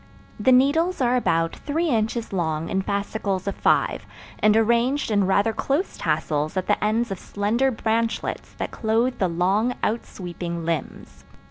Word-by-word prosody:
The 235 +5 +3
needles 305 +8 +3
are 250 -1 +2
about 165 -8 +1
three 320 +3 -1
inches 225 -2 -1
long 160 -3 -1
in 190 - 0
fascicles 200 -1 -2
of 200 - 0
five, - - +1 0.4
and 215 0 +4
arranged 235 +4 +2
in 205 -2 +2
rather 200 +3 +2
close 290 - -1
tassels 155 +1 -1
at 185 - 0
the 210 - +1
ends 225 +2 +1
of 190 - -4
slender 220 +6 0
branchlets 230 -1 -2
that - - -3
clothe 230 +3 0
the 190 - +2
long 195 +8 +1
outsweeping 175 -6 -3
limbs. 165 -4 -4
215 Hz, 150 wpm, -23 LUFS, 185-240 Hz, 0.4 s, and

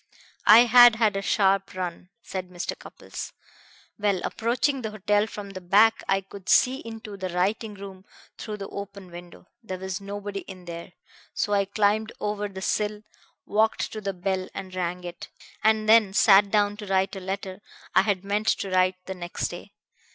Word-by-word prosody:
"I 220 +2 +10
had 245 0 +8
had 220 -3 +2
a 195 - -1
sharp 195 -1 +1
run," 180 -1 -5
said 185 -1 -6
Mr. 175 -1 -4
Cupples. - - -9 0.7
"Well, 200 -2 +1
approaching 245 +4 0
the 220 - -3
hotel 210 0 +1
from 205 -2 -8
the 185 -1 -8
back 210 +5 +4
I 195 0 +2
could 195 0 -11
see 260 +2 +4
into 225 -3 -9
the 185 -1 -4
writing 205 +5 -1
room 195 -1 -10 0.3
through 215 -1 -6
the 195 -1 -6
open 200 -2 -8
window. 175 +1 -12 0.2
There 190 -5 -6
was 190 +1 -5
nobody 200 0 -5
in 185 -2 -11
there, 170 +1 -8 0.4
so 205 - 0
I 200 -1 +3
climbed 210 +2 +1
over 210 0 -2
the 190 -1 -8
sill, 210 +1 -1 0.4
walked 220 +2 +1
to 215 - -6
the 195 -1 -3
bell 185 0 -2
and 190 -1 -7
rang 180 0 -3
it, 175 0 -8 0.3
and 220 0 +3
then 215 -3 +5
sat 200 0 +6
down 205 0 +1
to 210 -1 -8
write 190 0 +1
a - - -5
letter 190 +1 -5 0.3
I 185 - +6
had 195 -2 -1
meant 205 +2 -1
to 195 - 0
write 185 0 +3
the 190 - -5
next 175 -1 -4
day. - - -10
200 Hz, 180 wpm, -25 LUFS, 185-210 Hz, 0.7 s, I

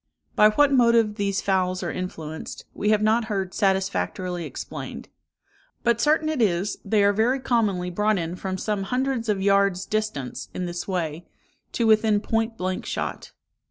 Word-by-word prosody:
By 210 - +7
what 280 +6 +3
motive 235 -4 +4
these 200 -1 -1
fowls 185 -1 0
are - - -2
influenced, 160 -4 -6
we 210 - -1
have 215 0 +3
not 220 +2 +3
heard 195 -4 -3
satisfactorily 190 -3 -1
explained; - - -7 0.7
but 235 -1 +2
certain 310 +1 +3
it 310 -5 0
is, 195 -1 +1
they 205 0 +2
are 200 0 +4
very 235 +6 +2
commonly 205 -8 0
brought 210 +3 +1
in 170 0 -3
from 190 0 -4
some 210 +1 -2
hundreds 250 -1 -1
of 195 -2 0
yards' 200 -2 +3
distance, 215 -13 -3
in 185 - -2
this 175 0 -5
way, 170 -3 -3 0.5
to 235 - 0
within 215 -1 +4
point 225 +1 -1
blank 185 0 -2
shot. - - -4
205 Hz, 160 wpm, -24 LUFS, 185-225 Hz, 0.7 s, By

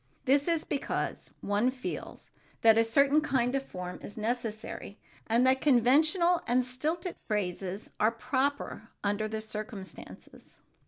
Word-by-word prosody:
This 280 +3 +3
is 330 -2 +1
because 280 - -3
one 205 +5 +2
feels 255 0 -6 0.3
that 225 -1 +8
a 225 - +5
certain 280 +6 +4
kind 260 -4 +1
of 275 - +1
form 180 -8 -7
is 205 - -9
necessary 220 -2 -3 0.3
and 235 +3 +3
that 260 0 +4
conventional 310 - +4
and 250 +1 +3
stilted 315 +8 -3
phrases 195 -1 -3
are 215 - +5
proper 255 0 -2
under 205 +1 0
the 220 0 -4
circumstances. 215 -2 -8
245 Hz, 130 wpm, -30 LUFS, 215-275 Hz, 0.3 s, that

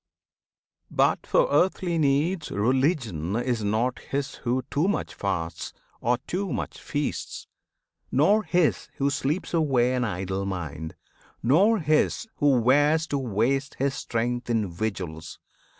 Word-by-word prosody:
But - - +1
for - - +3
earthly 175 -2 +2
needs 150 +4 +1
Religion 115 - 0
is 120 -2 -1
not 110 +5 0
his 140 0 -3
who 125 +1 -1
too 150 +6 +1
much 205 - -1
fasts 85 -4 -3 0.3
Or 120 +1 +1
too 190 0 -2
much - - -4
feasts, 145 0 -3 0.7
nor 180 +11 +4
his 175 -6 +1
who 140 +1 +1
sleeps 140 +7 -2
away 135 -7 +2
An 125 -1 0
idle 95 -2 -2
mind; 80 -4 -5 0.5
nor 190 - +4
his 155 +6 +1
who 140 -4 +4
wears 145 +6 +4
to 140 - 0
waste 130 +4 0
His 135 0 0
strength 120 -1 -2
in 110 -5 0
vigils. 85 -4 -4
130 Hz, 130 wpm, -26 LUFS, 110-150 Hz, 0.7 s, nor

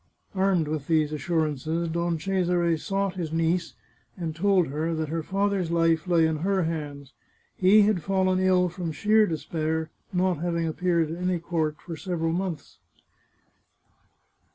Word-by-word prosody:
Armed 190 -4 +2
with 150 -2 -3
these 155 -2 +2
assurances, 160 +1 -1
Don 170 +1 -1
Cesare 175 -1 +1
sought 195 +3 -2
his 165 -4 -3
niece, 165 +1 0 0.4
and 165 -3 -4
told 190 +1 +3
her 160 +4 -2
that 155 -1 -2
her 165 +1 -2
father's 195 0 0
life 165 0 +2
lay 170 -2 +4
in 160 -1 0
her 190 +3 0
hands; 145 -4 -5 0.4
he 200 +3 +6
had 205 -4 +2
fallen 185 0 +1
ill 185 -1 +3
from 175 -1 -4
sheer 215 +7 +3
despair, 160 0 -2 0.2
not 180 -3 +1
having 170 0 -1
appeared 165 0 0
at 170 +2 -6
any 180 0 +1
court 160 -2 -2
for 170 - -7
several 165 -2 -2
months. 175 -5 -4
170 Hz, 150 wpm, -26 LUFS, 160-185 Hz, 0.4 s, he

